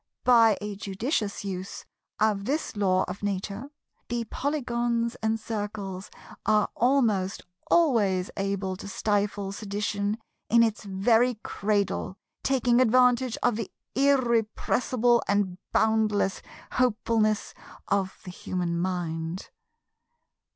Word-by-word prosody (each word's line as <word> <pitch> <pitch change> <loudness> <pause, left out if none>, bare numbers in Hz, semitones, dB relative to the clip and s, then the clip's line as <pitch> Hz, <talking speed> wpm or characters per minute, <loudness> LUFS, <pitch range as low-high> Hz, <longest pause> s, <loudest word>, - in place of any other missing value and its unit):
By 230 -4 +6
a 210 -1 -4
judicious 205 - -2
use 190 0 -5 0.3
of 210 -2 +2
this 290 -1 -2
Law 185 -2 +2
of 180 +2 -6
Nature, 205 +5 -3 0.4
the 235 0 -2
Polygons 240 -5 -1
and 220 0 0
Circles 205 -3 -5 0.3
are 215 -1 +3
almost 225 -7 +2 0.3
always 210 - +3
able 195 -1 -2
to 200 - -8
stifle 205 -2 -1
sedition 205 0 -2 0.3
in 230 0 +6
its 220 -2 -1
very 225 +5 +3
cradle, 200 -2 -1 0.2
taking 250 -2 +3
advantage 250 0 +4
of 245 -3 +2
the 225 - -4 0.2
irrepressible 245 -2 +2
and 200 -3 0
boundless 215 -3 +2 0.3
hopefulness 220 -3 +1 0.3
of 195 -1 0
the 180 - -7
human 175 -1 -3
mind. 170 -1 -3
210 Hz, 105 wpm, -27 LUFS, 195-235 Hz, 0.4 s, By